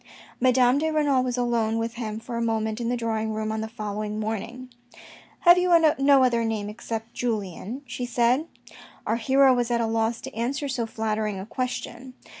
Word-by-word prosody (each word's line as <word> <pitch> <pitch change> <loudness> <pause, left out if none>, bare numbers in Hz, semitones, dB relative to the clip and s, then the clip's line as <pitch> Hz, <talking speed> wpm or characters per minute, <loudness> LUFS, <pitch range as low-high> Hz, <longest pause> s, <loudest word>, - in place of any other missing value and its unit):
Madame 255 +1 +4
de 320 +1 0
Renal 290 -4 +2
was 250 -1 -2
alone 230 -2 0
with 230 0 -2
him 220 -3 -5
for 235 +1 -7
a 235 - -1
moment 220 0 -1
in 235 - -1
the 245 - 0
drawing 220 -2 -2
room 215 0 -2
on 220 0 -2
the 220 - -3
following 215 -1 -4
morning. 225 +4 -4 0.4
" - - -16 0.3
Have 350 0 +7
you 360 0 +1 0.3
no 275 -1 +5
other 235 -2 +2
name 215 -2 -2
except 225 +1 -6
Julien," 220 - -4
she 250 0 -5
said. 245 +5 +2 0.6
Our 225 - 0
hero 265 +3 +4
was 245 -1 0
at 240 -1 +1
a 230 - +1
loss 225 +1 0
to - - -8
answer 270 +5 -2
so 245 -4 -2
flattering 215 -2 -2
a 190 - -6
question. 255 +1 -5
235 Hz, 195 wpm, -25 LUFS, 220-255 Hz, 0.6 s, Have